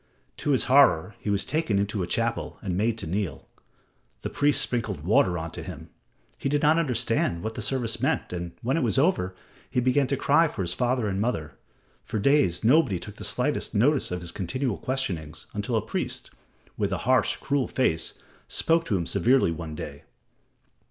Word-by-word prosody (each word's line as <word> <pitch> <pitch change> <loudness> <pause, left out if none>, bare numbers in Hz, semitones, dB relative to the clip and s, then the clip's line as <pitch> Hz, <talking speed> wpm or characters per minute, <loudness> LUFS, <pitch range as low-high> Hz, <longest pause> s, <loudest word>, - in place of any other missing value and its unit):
To - - -3
his 135 -3 +3
horror 125 - +4
he - - -4
was 100 -1 +1
taken 155 -10 0
into 100 0 -1
a 90 - -2
chapel 115 +4 -1
and 95 -4 -2
made 110 +4 +1
to - - -5
kneel. 85 -4 -3 0.7
The - - -4
priests 145 0 +3
sprinkled 110 - -2
water 90 -2 +3
on 80 0 -5
him. 80 -3 -8 0.5
He 135 - -1
did 145 +1 0
not 155 +2 +5
understand 115 - 0
what 110 - -3
the 120 - -5
service 120 -1 -1
meant, - - 0
and 85 -1 -5
when 130 +6 +1
it - - +1
was 120 +2 +1
over 130 - +2 0.3
he 125 - 0
began 130 +2 +2
to 140 - 0
cry 155 +6 +4
for 100 - -4
his 90 0 -1
father 125 +2 0
and 100 0 -1
mother. 85 -10 -2 0.5
For - - -4
days 120 - +3
nobody 125 - +4
took - - -9
the - - -8
slightest - - -1
notice 135 +6 +3
of 90 0 -4
his 85 -1 -6
continual 105 +6 -2
questionings 85 - -3
until 105 +3 -2
a 110 - 0
priest, - - -3 0.5
with 100 -2 0
a 95 - 0
harsh, 130 +1 +3
cruel 140 -2 -1
face, 80 -11 0 0.3
spoke 165 0 +2
to 105 - +1
him 85 - -2
severely 125 0 +3
one 80 -2 -6
day. 70 -1 -7
110 Hz, 190 wpm, -26 LUFS, 90-130 Hz, 0.7 s, not